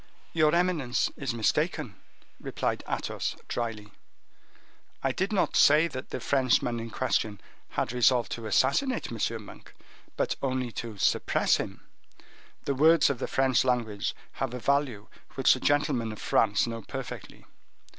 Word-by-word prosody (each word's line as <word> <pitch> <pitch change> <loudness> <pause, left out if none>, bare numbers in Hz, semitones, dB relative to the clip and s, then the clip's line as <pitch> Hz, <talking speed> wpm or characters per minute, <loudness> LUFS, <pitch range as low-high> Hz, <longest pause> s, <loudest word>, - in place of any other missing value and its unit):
"Your 155 -1 +3
eminence 170 -8 +1
is 140 - -3
mistaken," 110 -2 0 0.5
replied - - -2
Athos, - - -2
dryly; 110 -3 -4 1.1
"I 135 - +2
did 190 - -2
not 200 -4 +1
say 150 +3 +6
that 130 -3 -7
the - - -4
Frenchman 125 -3 +1
in 115 0 -6
question 110 -4 -1 0.3
had - - -2
resolved 125 -1 +3
to 115 -1 -5
assassinate 140 - +1
M. 115 -1 -2
Monk, - - -14 0.4
but - - 0
only 130 -2 -1
to 115 -1 -6
suppress 95 - +2
him. - - -6 0.8
The 140 - 0
words 155 +2 +5
of 130 - -5
the - - -2
French 130 -2 +2
language 115 -5 -1 0.2
have 130 -2 -4
a - - -4
value 130 -5 0 0.3
which 135 - +5
the 130 - -3
gentlemen 125 -5 +1
of 110 - -9
France 105 -3 +2
know 115 -1 -5
perfectly. - - -8
125 Hz, 145 wpm, -28 LUFS, 115-140 Hz, 1.1 s, say